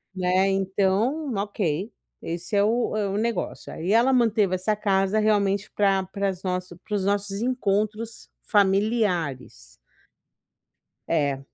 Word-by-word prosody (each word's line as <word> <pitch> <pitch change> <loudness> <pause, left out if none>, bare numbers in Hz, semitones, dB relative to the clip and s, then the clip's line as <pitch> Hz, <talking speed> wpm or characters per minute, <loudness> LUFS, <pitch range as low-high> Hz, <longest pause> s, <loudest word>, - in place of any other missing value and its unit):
né, 185 +1 +2
então 195 +9 0
ok, 200 -1 -2 0.3
esse 170 +5 -4
é 200 - +4
o 230 +1 +1
é 210 -2 0
o 200 - -2
negócio, 230 -2 -3
aí 175 +5 -3
ela 240 +4 +4
manteve 215 -6 +3
essa 200 +4 0
casa 195 0 +1
realmente 205 -1 +1
pra 195 -2 +2
para 200 +1 -2 0.6
os 205 -2 0
nossos 200 0 -1
encontros 220 -2 -1
familiares. 190 - 0 1.3
É, 145 -4 +1
200 Hz, 115 wpm, -25 LUFS, 190-215 Hz, 1.3 s, é